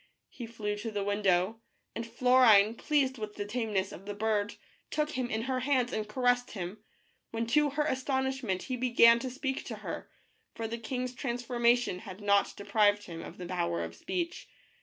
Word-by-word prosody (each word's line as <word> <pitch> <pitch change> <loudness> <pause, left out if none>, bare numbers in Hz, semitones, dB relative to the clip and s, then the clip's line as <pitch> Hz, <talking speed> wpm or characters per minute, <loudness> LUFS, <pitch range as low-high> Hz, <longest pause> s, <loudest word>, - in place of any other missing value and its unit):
He 240 - -8
flew 210 -2 -3
to 210 +2 -4
the 205 -2 -2
window, 200 +1 +1 0.3
and 230 0 -5
Florine, 230 -3 +5
pleased 265 -1 0
with 215 -1 -5
the 205 - -4
tameness 210 -3 -1
of 195 - -11
the 205 - -4
bird, 210 -1 0 0.3
took 300 0 -1
him 255 -4 -2
in 220 0 -1
her 260 0 -1
hands 255 -2 +1
and 215 -1 -2
caressed 245 +1 +1
him, 190 +1 -5 0.5
when 230 0 -2
to 295 +5 +3
her 290 +2 0
astonishment 265 -7 -1
he 255 - -3
began 235 -1 +6
to 260 +1 -4
speak 265 +1 -3
to - - -5
her, - - -5 0.5
for 225 - -3
the 230 +1 -4
king's 250 +2 -3
trans 245 -1 -3
formation 240 -4 +2
had 195 -2 -9
not 200 -1 +2
deprived 205 0 +2
him 165 -3 -7
of - - -9
the 180 - -6
power 85 - -1
of 85 0 -6
speech. 345 - -4
230 Hz, 185 wpm, -30 LUFS, 205-255 Hz, 0.5 s, began